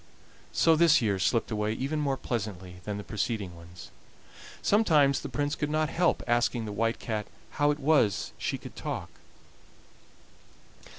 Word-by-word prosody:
So 165 - +4
this 165 0 +5
year 105 -6 0
slipped 115 +5 +1
away 105 0 0
even 140 +6 -2
more 140 -3 0
pleasantly 95 -8 -4
than 105 -1 -3
the 105 - -6
preceding 105 -3 -3
ones. 85 +1 -12 0.7
Sometimes 155 -10 +4
the 145 - -6
Prince 145 +3 -1
could 150 -2 -2
not 155 0 +1
help 175 +1 +1
asking 120 -1 +1
the 105 - -5
White 115 +3 0
Cat 110 -2 -3 0.2
how 145 -1 +2
it 145 - +1
was 145 - +2
she - - -2
could - - -11
talk. - - -5
120 Hz, 155 wpm, -28 LUFS, 105-150 Hz, 0.7 s, this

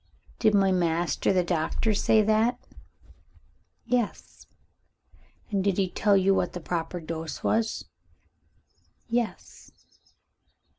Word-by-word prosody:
"Did 215 -3 +3
my 195 -1 +4
master 170 -3 +1
the 185 -2 +2
Doctor 175 +6 0
say 215 +1 +3
that?" 220 +3 +2 1.3
"Yes." 240 -2 -3 1.0
"And 195 -2 0
did 195 -2 +1
he 190 -2 0
tell 205 -2 +3
you 195 +1 +3
what - - 0
the 180 - -5
proper 170 +1 -3
dose 160 -1 -6
was?" 225 0 0 1.2
"Yes." 235 -1 -4
195 Hz, 105 wpm, -26 LUFS, 175-215 Hz, 1.3 s, my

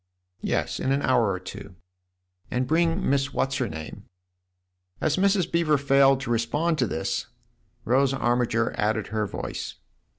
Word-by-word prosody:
" 90 - -53
Yes, - - -1
in 130 - 0
an 140 +1 +1
hour 120 -5 +3
or 95 - -3
two." 95 0 -9 0.7
"And 125 +1 0
bring 165 +5 +1
Miss 135 0 0
What's 135 +1 0
her - - -1
name?" 80 0 -8 0.9
As 155 -1 +1
Mrs. 195 -1 +2
Beever 165 -3 +3
failed 135 -1 +4
to 130 - -3
respond 150 +8 0
to 125 - +2
this, 80 - -2 0.6
Rose 135 +3 +3
Armiger 120 -3 +1
added 105 0 0
her 110 -1 0
voice. - - -5
135 Hz, 155 wpm, -25 LUFS, 115-150 Hz, 0.9 s, failed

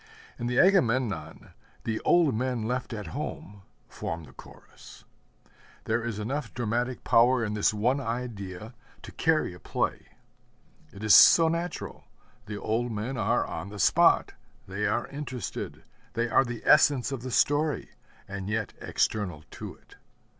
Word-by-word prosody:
In 120 - -2
the 125 0 -1
Agamemnon 130 - +2 0.3
'the 110 -1 -2
old 170 -6 +3
men 125 0 -1
left 125 +1 -3
at 105 -8 -6
home' 100 +1 -6 0.3
form 85 0 -5
the 65 -4 -15
Chorus. - - -15 0.8
There 115 +1 -1
is 115 -3 -3
enough 120 +3 -3
dramatic 120 +2 -2
power 120 +1 +4
in 105 - -3
this 105 -1 +2
one 120 +6 +1
idea 115 -4 -5 0.3
to - - -9
carry - - +1
a - - -12
play. - - -2 0.8
It 100 - -10
is 110 -2 +5
so 165 - +8
natural: 170 0 -4 0.4
the 105 -1 -5
old 115 +3 -1
men 110 +5 -3
are 115 +2 +1
on 100 - -6
the 105 - -9
spot; 100 - +4 0.3
they 100 +2 -2
are 110 +4 0
interested; 130 -6 -6 0.3
they 115 +1 0
are 120 +4 +3
the 120 -1 -6
essence 145 -4 +5
of 135 -3 -4
the 130 - -6
story, 145 +4 +1 0.4
and 100 0 -6
yet 110 -1 -2
external 90 -8 -1
to - - -8
it. - - -21
115 Hz, 150 wpm, -27 LUFS, 105-130 Hz, 0.8 s, so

